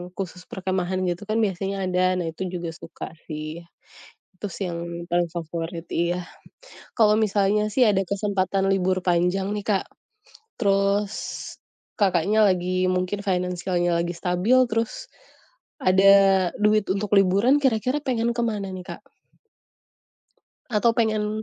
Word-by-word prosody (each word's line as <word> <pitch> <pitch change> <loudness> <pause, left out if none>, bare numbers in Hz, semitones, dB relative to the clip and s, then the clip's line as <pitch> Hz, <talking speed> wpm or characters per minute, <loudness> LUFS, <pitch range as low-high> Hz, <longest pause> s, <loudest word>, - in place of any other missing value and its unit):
khusus 180 -1 -6
perkemahan 185 0 -2
gitu 175 +4 -4
kan, 215 +1 0
biasanya 195 -1 -1
ada. 185 0 +2
Nah, 175 - -2
itu 190 +4 -5
juga 175 -2 -4
suka - - -9 0.2
sih. 155 +1 -6 0.8
Itu 205 - -4
sih 190 +2 -4
yang 170 0 -6
paling 175 0 +1
favorit 165 0 -5
iya. 175 +1 -1 0.7
Kalau 215 -2 +4
misalnya 210 0 +1
sih 255 - +2
ada 195 -2 +2
kesempatan 195 -1 0
libur 185 -1 +1
panjang 180 +2 +1
nih 205 - -5
Kak, 200 -3 +1 0.7
terus 200 0 +1 0.9
Kakaknya, 200 +2 +3
lagi 185 -1 +1
mungkin 185 +2 -2
financial-nya 180 -2 0
lagi 170 +1 0
stabil, 180 +6 +1
terus 230 - -3 0.7
ada 195 0 +5
duit 210 0 +3
untuk 205 +1 0
liburan, 200 +7 +4
kira-kira 255 +1 +1
pengen 235 -3 0
ke 240 - -1
mana 210 -4 -2
nih 185 -1 -7
Kak? - - -8 1.7
Atau 230 +1 +3
pengen 215 -1 0
190 Hz, 130 wpm, -24 LUFS, 180-210 Hz, 1.7 s, ada